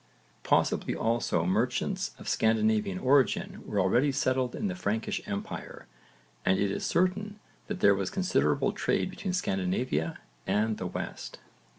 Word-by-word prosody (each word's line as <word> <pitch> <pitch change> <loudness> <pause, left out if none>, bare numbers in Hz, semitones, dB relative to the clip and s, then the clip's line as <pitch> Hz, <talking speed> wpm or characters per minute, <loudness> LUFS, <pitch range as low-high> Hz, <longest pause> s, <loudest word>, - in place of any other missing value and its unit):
Possibly - - +1
also 115 -7 0
merchants 125 - 0
of - - -11
Scandinavian 110 -3 +2
origin 130 +4 +2
were 105 - -1
already 120 +10 +3
settled 130 -2 0
in - - -3
the 185 - -2
Frankish 110 - -2
empire 100 -1 -6 0.6
and 95 - +3
it 100 -1 +1
is - - -3
certain 205 +4 0 0.3
that 205 -3 -4
there 100 - +7
was 95 -1 -1
considerable 190 -1 +1
trade - - 0
between 190 - -4
Scandinavia 95 - -1 0.3
and 105 +2 +1
the 95 - -2
West. - - -6
110 Hz, 135 wpm, -29 LUFS, 100-145 Hz, 0.6 s, there